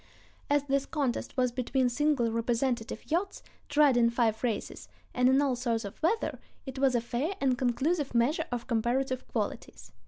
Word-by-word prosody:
As 290 0 +3
this 275 -1 0
contest 275 -4 -2
was 250 -1 +2
between 255 +1 0
single 245 -2 +1
representative 235 +2 -2
yachts, 365 +5 -1 0.3
tried 290 -3 +4
in 235 -1 +4
five 230 -2 +1
races, 230 -4 -3 0.2
and 250 0 +3
in 265 +1 +4
all 270 -3 +1
sorts 235 -3 -1
of 200 - -9
weather, 420 +8 0 0.3
it 265 -1 -6
was 265 -2 +3
a 240 - +2
fair 255 +10 -2
and 265 -2 +2
conclusive 265 +4 0
measure 290 +8 +2
of 240 -1 -3
comparative 255 +3 -1
qualities. - - -5
255 Hz, 165 wpm, -29 LUFS, 240-280 Hz, 0.3 s, tried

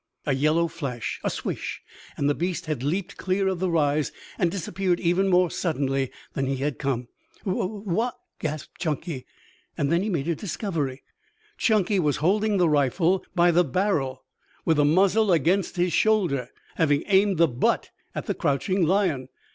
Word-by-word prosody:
A 140 - +1
yellow 155 +5 +2
flash, 140 -8 -4
a - - +1
swish - - -4 0.4
and 140 - +1
the 145 - +3
beast 175 +3 -2
had 155 -6 -3
leaped 180 +7 -2
clear 190 +1 0
of 190 -2 -1
the 185 0 0
rise 150 -3 +1 0.3
and 175 - +3
disappeared 180 0 -1
even 180 +3 +2
more 180 -2 +3
suddenly 135 -6 -1 0.2
than 135 -1 -1
he 135 - 0
had 140 +1 -2
come. 130 -4 -1 0.4
"Wha 185 -2 0
wha 210 +3 -2 0.2
" - - -55
gasped 155 -1 -5
Chunky. 155 -4 -3 0.5
Then 165 +5 +2
he 210 - -1
made 160 -6 -1
a 170 - +2
discovery. 155 - -3 0.6
Chunky 210 -3 +2
was 150 -5 +1
holding 205 +5 +2
the 180 -2 +4
rifle 160 +5 +2
by 175 0 +5
the 175 +2 +4
barrel 135 -5 -1 0.4
with 160 -2 +3
the 145 - +4
muzzle 195 +6 +4
against 175 +4 +2
his 175 -1 +1
shoulder, 170 - +2 0.3
having 145 -3 +2
aimed 195 -1 +3
the 170 +1 +5
butt 125 -3 0 0.2
at - - -3
the - - -1
crouching 180 +7 0
lion. 165 -7 +1
170 Hz, 170 wpm, -25 LUFS, 145-190 Hz, 0.6 s, by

